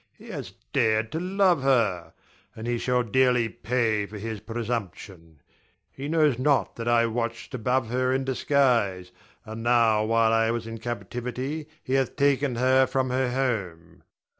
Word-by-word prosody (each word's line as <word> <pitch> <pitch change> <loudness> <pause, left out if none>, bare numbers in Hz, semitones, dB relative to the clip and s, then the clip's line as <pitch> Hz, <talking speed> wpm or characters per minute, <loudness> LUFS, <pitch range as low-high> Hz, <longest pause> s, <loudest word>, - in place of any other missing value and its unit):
He - - -14
has - - -7 0.2
dared 110 0 +2
to 160 - -2
love 185 -3 +2
her; 105 -11 +1 0.4
and 110 - -7
he 120 0 -1
shall 125 0 +1
dearly 125 0 +2
pay 110 -3 -1
for 105 - -9
his 110 +1 -5
presumption. 100 -8 -6 0.5
He 140 +1 -7
knows 150 -5 +2
not 140 0 +1
that 115 0 -5
I 120 -1 +4
watched 115 0 -3
above 125 0 0
her 130 +1 0
in 135 +1 0
disguise; 120 -9 +1 0.3
and 110 +1 -7
now 115 -2 +3
while 115 0 +3
I 115 0 +3
was 115 0 -2
in 115 0 -7
captivity 125 +5 -5 0.2
he 130 - -3
hath 135 -1 +1
taken 140 -2 +2
her 130 +2 +3
from 130 0 -1
her 130 0 +1
home. 95 -11 -3
120 Hz, 160 wpm, -26 LUFS, 110-130 Hz, 0.5 s, I